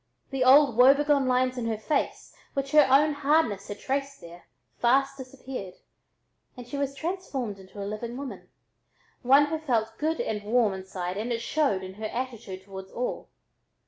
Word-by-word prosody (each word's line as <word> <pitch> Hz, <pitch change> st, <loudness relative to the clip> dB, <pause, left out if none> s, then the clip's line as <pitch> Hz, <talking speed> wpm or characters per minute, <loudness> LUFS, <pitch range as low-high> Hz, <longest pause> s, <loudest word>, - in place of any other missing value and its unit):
The 270 Hz, -1 st, 0 dB
old 265 Hz, -2 st, +6 dB
woebegone 275 Hz, +2 st, +5 dB
lines 255 Hz, 0 st, +1 dB
in 230 Hz, -, -2 dB
her 220 Hz, -1 st, -1 dB
face, 280 Hz, +7 st, -2 dB, 0.2 s
which 275 Hz, 0 st, -2 dB
her 300 Hz, -1 st, +6 dB
own 295 Hz, +3 st, +5 dB
hardness 285 Hz, -8 st, +1 dB
had 205 Hz, -, -6 dB
traced 275 Hz, +1 st, -3 dB
there, 170 Hz, +1 st, -13 dB, 0.3 s
fast 270 Hz, +3 st, +3 dB
disappeared, 255 Hz, -7 st, -8 dB, 0.8 s
and 245 Hz, -1 st, -9 dB
she 245 Hz, -, -6 dB
was 280 Hz, -1 st, -2 dB
transformed 275 Hz, -, -4 dB
into 190 Hz, +2 st, -13 dB
a 200 Hz, -, -4 dB
living 230 Hz, +4 st, -5 dB
woman, 275 Hz, -1 st, -8 dB, 0.7 s
one 275 Hz, +4 st, +6 dB
who 315 Hz, +2 st, -3 dB
felt 225 Hz, -7 st, -1 dB
good 320 Hz, +2 st, 0 dB
and 210 Hz, -1 st, -2 dB
warm 220 Hz, -1 st, +2 dB
inside 190 Hz, -1 st, -5 dB
and 225 Hz, +4 st, -3 dB
showed 235 Hz, -6 st, 0 dB
it -, -, -5 dB
in 185 Hz, -, -8 dB
her -, -, -3 dB
attitude 230 Hz, -6 st, -6 dB
toward 190 Hz, -1 st, -9 dB
all. 245 Hz, +4 st, -4 dB
250 Hz, 170 wpm, -27 LUFS, 210-275 Hz, 0.8 s, old